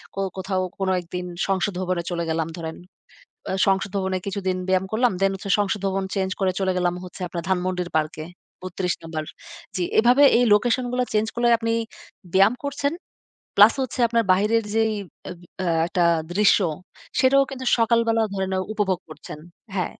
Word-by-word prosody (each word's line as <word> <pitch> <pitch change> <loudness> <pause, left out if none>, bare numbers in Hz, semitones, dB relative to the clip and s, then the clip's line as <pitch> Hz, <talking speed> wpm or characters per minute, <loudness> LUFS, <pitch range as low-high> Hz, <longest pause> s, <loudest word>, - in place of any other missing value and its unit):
কো - - -4 0.2
কোথাও 190 0 -1 0.2
কোন 190 -1 0
একদিন 180 +1 -6 0.2
সংসদ 195 +1 0
ভবনে 180 -2 -1
চলে 170 -1 -1
গেলাম 160 -1 -1
ধরেন। 160 -1 -5 0.7
বা - - -4
সংসদ 195 +1 +1
ভবনে 190 -1 -1
কিছুদিন 190 -2 -2
ব্যায়াম 185 0 +2
করলাম। 240 +1 +2
দেন 195 - +4
হচ্ছে 195 +1 -6
সংসদ 205 0 0
ভবন 195 0 -1
চেঞ্জ 190 -1 -1
করে 190 -1 +2
চলে 190 -1 +1
গেলাম 175 -1 +1
হচ্ছে 180 - -11
আপনার 170 0 -5
ধানমন্ডির 180 -1 -1
পার্কে। 155 0 -1 0.4
৩২ 185 -1 -2
নম্বর। 160 -1 -5 0.5
জি, 185 - -1 0.2
এভাবে 245 +5 +5 0.2
এই 245 - +4
লোকেশনগুলা 245 +3 +1
চেঞ্জ 215 +1 +2
করলে 240 0 +2
আপনি 230 0 -1 0.6
ব্যায়াম 195 +5 +5
করছেন। 285 +1 -1 0.6
প্লাস 210 +3 +8
হচ্ছে 260 0 -6
আপনার 230 0 +1
বাহিরের 210 +5 +2
যেই 220 -1 +2 0.4
আম 175 - -9 0.2
আ - - -2 0.2
একটা 175 +1 0 0.3
দৃশ্য, 205 +2 +5 0.6
সেটাও 275 +1 +5
কিন্তু 260 -2 -7
সকালবেলা 230 -1 +2
ধরে 190 -1 -1
নেও 185 0 0
উপভোগ 195 -4 0
করছেন। 155 -1 -10 0.4
হ্যা। 185 - +1
195 Hz, 165 wpm, -23 LUFS, 185-225 Hz, 0.7 s, প্লাস